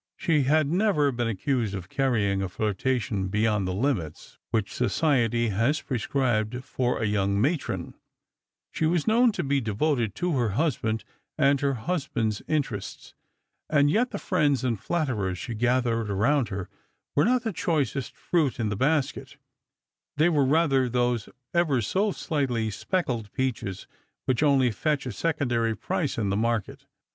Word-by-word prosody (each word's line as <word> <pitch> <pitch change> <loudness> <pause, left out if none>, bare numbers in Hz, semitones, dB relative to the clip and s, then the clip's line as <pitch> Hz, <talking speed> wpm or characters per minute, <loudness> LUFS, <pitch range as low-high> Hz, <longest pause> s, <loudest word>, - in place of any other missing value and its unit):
She 155 -6 +2
had 155 +3 +3
never 175 -7 +2
been 120 -2 -1
accused 115 0 -1
of 95 -2 -6
carrying 105 -7 +1
a 95 - -2
tiirtation 110 0 -1
beyond 105 -1 +1
the 90 - -2
hmits 95 - -2
which 110 -3 -1
society 120 -2 +1
has 115 +9 +1
pi*escribed 125 -2 -1
for 125 -1 -1
a 115 - 0
young 100 -1 +1
matron; 145 +7 -1 0.8
she 160 - 0
was 170 -1 +1
known 235 +2 +4
to - - -2
be 140 -1 +1
devoted 115 +1 0
to 175 -3 -1
her 120 -3 +1
husband 115 -8 0 0.3
and 140 -2 +3
her 140 -1 +1
husband's 120 - -2
interests; 135 -10 -3 0.6
and 145 -1 +4
yet 245 +8 +2
the 205 - -4
friends 145 -9 +1
and 120 -5 0
flatterers 110 - -1
she 120 +6 -5
gathered 120 -1 +1
around 115 +5 +2
her 95 -1 -4 0.5
were 145 - +4
not 250 0 +2
the 225 -4 -2
choicest 140 -7 -1
fruit 150 -7 0
in 110 -2 0
the 100 - -2
basket; 135 +1 -1 0.8
they 155 +3 +4
were 145 -5 +3
rather 135 -3 +3
those 120 -2 0 0.2
ever 165 -7 +2
so 195 - +1
slightly 125 - -1
speckled 120 - -2
peaches 120 -8 -2 0.4
which 130 0 +1
only 135 -5 +4
fetch 145 +4 -1
a 125 - -3
secondary 120 -9 0
price 180 -7 -2
in 100 -4 0
the - - +1
market. 115 -1 -2
130 Hz, 155 wpm, -26 LUFS, 110-150 Hz, 0.8 s, known